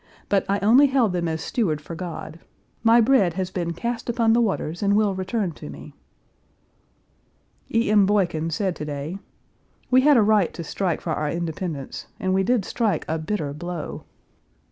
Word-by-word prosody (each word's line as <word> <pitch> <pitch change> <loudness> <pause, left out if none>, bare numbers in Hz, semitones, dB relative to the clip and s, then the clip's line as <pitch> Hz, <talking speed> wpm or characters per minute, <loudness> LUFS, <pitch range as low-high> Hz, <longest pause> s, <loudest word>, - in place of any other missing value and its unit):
But 200 -1 +2
I 200 - +2
only 245 +8 +6
held 255 -8 +2
them 175 -1 -1
as 160 0 -2
steward 165 -10 -1
for 155 +3 -9
God. 165 -2 -7 0.4
My 230 +1 +5
bread 220 -8 +3
has 185 -1 -3
been 170 -2 -2
cast 235 +5 -4
upon 230 -1 +3
the 240 - +4
waters 175 -6 -2
and 200 0 +2
will 210 -2 +2
return 190 +1 -2
to 145 - -10
me." 70 +1 -10 1.8
E. 230 -1 +2
M. 205 -2 +5
Boykin 175 -6 +1
said 180 +2 -1
to 150 - -5
day: 150 +5 -5 0.7
"We 255 +1 +6
had 290 0 +5
a 225 - +5
right 205 -4 +3
to 170 - -5
strike 175 +1 -2
for 165 - -2
our 150 -1 -1
independence, 165 -4 -4
and 190 -3 0
we 190 - +3
did 220 0 +1
strike 215 -9 -1
a 160 +1 -1
bitter 155 -3 -3
blow. 175 +1 -6
190 Hz, 180 wpm, -23 LUFS, 160-220 Hz, 1.8 s, only